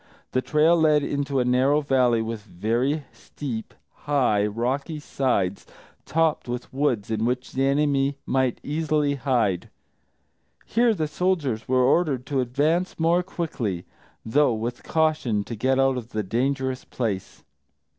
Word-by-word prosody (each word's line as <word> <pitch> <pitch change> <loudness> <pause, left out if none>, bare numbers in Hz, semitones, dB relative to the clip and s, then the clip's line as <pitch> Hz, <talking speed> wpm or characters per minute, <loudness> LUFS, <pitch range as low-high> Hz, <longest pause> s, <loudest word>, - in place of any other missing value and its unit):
The 130 - +1
trail 155 +5 +3
led 155 -3 +4
into 140 -1 -1
a 125 - +1
narrow 130 +4 +3
valley 125 -5 +2
with 110 -1 -4
very 115 - -1
steep, 120 -7 -7 0.4
high, 125 -8 +2
rocky 130 +8 -2
sides, 120 -10 -1 0.4
topped 160 -1 +1
with 120 +1 -5
woods 125 -7 0
in 110 0 0
which 125 +2 -1
the 135 +1 +1
enemy 140 -1 +1
might 130 -2 0
easily 150 -1 0
hide. 120 -9 0 1.0
Here 235 0 +2
the 155 -4 -1
soldiers 150 -9 -1
were 130 0 +3
ordered 135 -2 +2
to 140 -3 0
advance 150 +10 0
more 170 +2 +3
quickly, 125 - -4 0.4
though 135 +1 +3
with 115 +2 -4
caution, 150 -10 +1
to 115 - -6
get 130 +4 +1
out 135 -1 +3
of 120 0 -8
the 110 - -1
dangerous 130 +5 -1
place. 105 -7 -4
130 Hz, 140 wpm, -24 LUFS, 115-150 Hz, 1.0 s, led